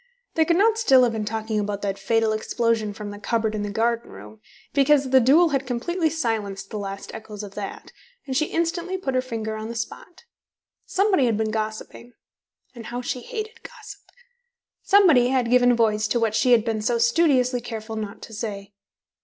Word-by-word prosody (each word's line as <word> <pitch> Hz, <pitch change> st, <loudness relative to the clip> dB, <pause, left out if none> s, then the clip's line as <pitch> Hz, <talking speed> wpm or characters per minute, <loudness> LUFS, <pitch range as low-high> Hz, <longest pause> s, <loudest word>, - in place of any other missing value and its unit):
They 320 Hz, -, +3 dB
could 335 Hz, +1 st, +2 dB
not 445 Hz, +3 st, +3 dB
still 265 Hz, -, +5 dB
have 240 Hz, -, +2 dB
been 220 Hz, -2 st, -3 dB
talking 220 Hz, 0 st, -2 dB
about 205 Hz, -1 st, -3 dB
that 200 Hz, -1 st, -2 dB
fatal 225 Hz, +2 st, +1 dB
explosion 220 Hz, -1 st, 0 dB
from 205 Hz, 0 st, -7 dB
the 205 Hz, -, -9 dB
cupboard 225 Hz, 0 st, -1 dB
in 215 Hz, -, -3 dB
the 205 Hz, -, -3 dB
garden 230 Hz, +2 st, -1 dB
room, 105 Hz, +2 st, -13 dB, 0.3 s
because 280 Hz, 0 st, +3 dB
the 265 Hz, -, +7 dB
duel 300 Hz, +8 st, +5 dB
had 275 Hz, -2 st, -1 dB
completely 320 Hz, +8 st, -1 dB
silenced 220 Hz, -10 st, -3 dB
the 215 Hz, -, -4 dB
last 195 Hz, -1 st, -6 dB
echoes 215 Hz, -1 st, -8 dB
of 200 Hz, -1 st, -9 dB
that, 200 Hz, -1 st, -7 dB, 0.3 s
and 265 Hz, -2 st, -4 dB
she 305 Hz, +3 st, +2 dB
instantly 345 Hz, +2 st, -2 dB
put 275 Hz, -8 st, -3 dB
her 255 Hz, -, +2 dB
finger 225 Hz, -3 st, -4 dB
on 215 Hz, 0 st, -5 dB
the 235 Hz, -, -6 dB
spot. 230 Hz, +9 st, -7 dB, 0.6 s
Somebody 385 Hz, -8 st, +2 dB
had 225 Hz, -3 st, +1 dB
been 220 Hz, 0 st, -1 dB
gossiping 220 Hz, +2 st, -5 dB, 0.6 s
(and 235 Hz, -3 st, -10 dB
how 245 Hz, +1 st, -4 dB
she 250 Hz, 0 st, -3 dB
hated 450 Hz, -, -6 dB
gossip); -, -, -11 dB, 0.8 s
somebody 340 Hz, -12 st, +5 dB
had 250 Hz, -2 st, 0 dB
given 245 Hz, -1 st, +5 dB
voice 220 Hz, -2 st, +1 dB
to 240 Hz, -, 0 dB
what 225 Hz, -2 st, +1 dB
she 245 Hz, +3 st, +3 dB
had 225 Hz, -2 st, +4 dB
been 220 Hz, -2 st, -1 dB
so 235 Hz, +2 st, +1 dB
studiously 250 Hz, 0 st, +2 dB
careful 225 Hz, -2 st, -6 dB
not 215 Hz, 0 st, -6 dB
to 225 Hz, -, -10 dB
say. 205 Hz, -2 st, -6 dB
230 Hz, 195 wpm, -23 LUFS, 215-270 Hz, 0.8 s, the